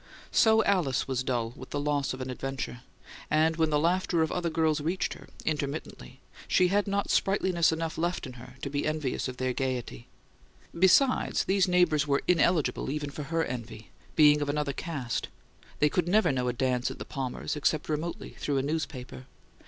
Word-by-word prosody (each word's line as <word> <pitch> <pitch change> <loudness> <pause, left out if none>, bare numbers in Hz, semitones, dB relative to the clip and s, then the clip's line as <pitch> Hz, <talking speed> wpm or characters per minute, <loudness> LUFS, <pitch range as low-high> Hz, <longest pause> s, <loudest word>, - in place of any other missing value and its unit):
So 220 0 +5
Alice 175 -11 +1
was 130 -1 -1
dull 120 -3 -1
with 130 - -10
the 145 - -2
loss 145 -1 0
of 130 - -5
an 130 0 -4
adventure; 135 -1 -5 0.5
and 160 +1 +3
when 160 -1 +2
the 150 - +2
laughter 170 +1 +2
of 160 - -2
other 175 -1 -1
girls 155 -2 +1
reached 170 +5 -1
her, - - -13 0.2
intermittently, 140 -3 -4 0.3
she 180 -1 +4
had 205 +2 +1
not 200 0 0
sprightliness 185 -4 +2
enough 160 0 -3
left 175 0 -1
in 130 - -8
her - - -12
to 140 - -2
be 145 +1 -1
envious 155 -5 -1
of 130 -1 -6
their 130 0 -1
gaiety. 125 -3 -3 0.7
Besides, 190 +10 +3
these 190 0 +2
neighbours 170 -5 +3
were 140 -1 +1
ineligible 170 -4 +2
even 145 0 -3
for 145 0 -6
her 165 +2 0
envy, 115 -3 -7 0.2
being 150 -1 +6
of 145 - -1
another 145 -1 -1
caste; 135 -7 -3 0.5
they 150 - +4
could 175 +3 0
never 185 -3 +4
know 125 -2 -1
a 125 - 0
dance 125 0 0
at - - -7
the - - -7
Palmers', 135 +2 -4
except 150 +1 0
remotely, 160 +2 -3
through 145 -2 -1
a 135 - +1
newspaper. 140 -4 -4
150 Hz, 185 wpm, -28 LUFS, 130-170 Hz, 0.7 s, being